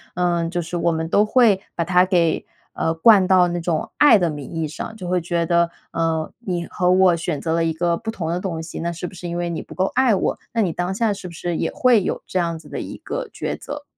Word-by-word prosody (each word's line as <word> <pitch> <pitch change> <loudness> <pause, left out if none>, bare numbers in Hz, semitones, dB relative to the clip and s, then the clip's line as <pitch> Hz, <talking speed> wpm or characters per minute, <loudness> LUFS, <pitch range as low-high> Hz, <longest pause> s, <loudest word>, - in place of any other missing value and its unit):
呃， 175 -1 +1
就 175 0 -2
是 175 +2 -6
我 170 0 +1
们 160 0 -2
都 205 +4 +4
会 215 -4 +4
把 170 - 0
它 180 +1 +4
给 175 -3 +1 0.3
呃 160 - 0
灌 195 +3 +6
到 180 -1 +5
那 175 0 -2
种 165 -2 -1
爱 290 -7 +7
的 175 -4 +1
名 145 -3 -7
义 165 -1 -2
上， 160 +8 -7
就 185 -4 -7
会 180 0 +1
觉 170 0 -1
得， 170 0 +2 0.2
呃， 165 -1 -1
你 180 -7 -3
和 180 0 +1
我 185 -1 +5
选 165 -3 -3
择 160 - -2
了 165 0 +1
一 165 - +1
个 170 +1 0
不 220 - -4
同 170 -8 -4
的 175 +2 -1
东 175 -4 -4
西， 160 +1 -7
那 170 +1 -1
是 170 +1 -5
不 - - -11
是 175 -1 -7
因 170 - -3
为 175 0 -2
你 170 - -3
不 - - -12
够 185 - +1
爱 255 -3 +4
我？ 195 - 0 0.2
那 230 - +1
你 180 -6 0
当 180 +3 -2
下 215 +1 +1
是 195 -2 -8
不 - - -12
是 175 +1 -3
也 - - -1
会 240 -5 +3
有 - - -2
这 - - -3
样 170 -2 -1
子 - - -16
的 - - -5
一 - - -7
个 - - -5
抉 - - -3
择？ 290 0 -7
175 Hz, 290 characters per minute, -21 LUFS, 165-190 Hz, 0.3 s, 爱